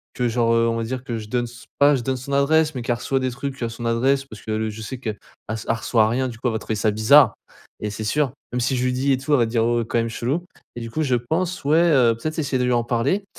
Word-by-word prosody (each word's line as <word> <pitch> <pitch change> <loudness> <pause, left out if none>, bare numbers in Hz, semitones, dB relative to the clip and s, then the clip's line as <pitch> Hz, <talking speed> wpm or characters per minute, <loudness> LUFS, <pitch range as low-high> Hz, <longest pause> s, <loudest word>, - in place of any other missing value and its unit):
que 125 -1 0
genre, 115 0 +2
heu, 115 0 +3
on 115 - -1
va 115 - -2
dire 125 +2 -4
que 120 -3 -4
je 110 - -7
donne 120 0 0
s 120 0 -12
pas 145 +1 +6
je 130 - -2
donne 130 +2 -1
son 130 +3 -8
adresse, 150 +3 +3
mais 125 - -3
qu'elle 120 0 0
reçoit 135 +3 -1
des 130 -1 -1
trucs 135 +1 -6
à 115 - 0
son 115 +1 -7
adresse 135 +4 +1
parce 110 -6 -12
qu'elle, 110 0 -2
heu, 110 - -1
je 110 +1 -8
sais 130 +4 -6
qu'elle 110 -5 -4 0.3
elle 110 +1 -1
reçoit 110 -1 +2
rien. 130 +2 0
Du 115 - -9
coup, 125 - -1
elle 115 - 0
va 110 - -1
trouver 110 - -3
ça 105 0 +1
bizarre 110 +4 +5 0.5
et 105 - -2
c'est 105 +1 -5
sûr. 140 +3 +1 0.2
Même 125 - 0
si 130 +2 +1
je 125 - 0
lui 125 - +1
dis 135 +2 +1
et 130 - +3
tout 145 +3 -2
elle 145 - +6
va 120 - +4
dire: 115 0 +1
«Oh 120 0 +1
quand 120 - -1
même 115 - +1
chelou» 140 +10 -2 0.3
et 120 - -5
du 115 - -6
coup, 155 - -2
je 130 -3 +2
pense, 165 +9 -2
ouais, 155 +3 +4
heu, 135 -9 +4
peut-être 155 +8 -4
essayer 140 -3 0
de - - +1
lui 125 - +1
en 120 -1 +1
parler 135 - 0
120 Hz, 310 wpm, -22 LUFS, 115-135 Hz, 0.5 s, pas